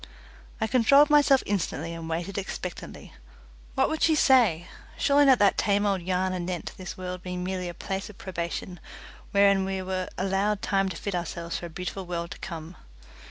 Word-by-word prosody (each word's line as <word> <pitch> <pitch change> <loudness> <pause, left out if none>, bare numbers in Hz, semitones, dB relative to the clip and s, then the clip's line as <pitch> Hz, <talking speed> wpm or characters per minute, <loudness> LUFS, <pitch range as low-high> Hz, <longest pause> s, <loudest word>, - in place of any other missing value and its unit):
I - - +1
controlled 260 +6 +5
myself 285 -2 +5
instantly 170 -4 -2
and 165 -1 -7
waited 170 +4 -3
expectantly. 185 -2 -7 0.6
What - - +3
would 315 - -3
she 320 - +4
say? 235 - +4 0.3
Surely 285 +1 +4
not 265 -2 +6
that 200 -1 +3
tame 205 0 +2
old 195 -2 +1
yarn 185 +1 0
anent 175 -1 -4
this 185 -2 -8
world 180 -1 -5
being 180 0 -5
merely 185 -1 -3
a 175 - -8
place 195 +3 -4
of 210 - -13
probation, 175 0 -5 0.5
wherein 200 -1 +4
we 190 0 -2
were 185 0 -3
allowed 195 +2 0
time 195 -1 +1
to 175 - -6
fit 200 - -4
ourselves 170 -1 -3
for 175 - -6
a - - -12
beautiful 180 +2 -6
world 170 -1 -4
to - - -8
come. 165 -1 -7
190 Hz, 180 wpm, -27 LUFS, 175-205 Hz, 0.6 s, not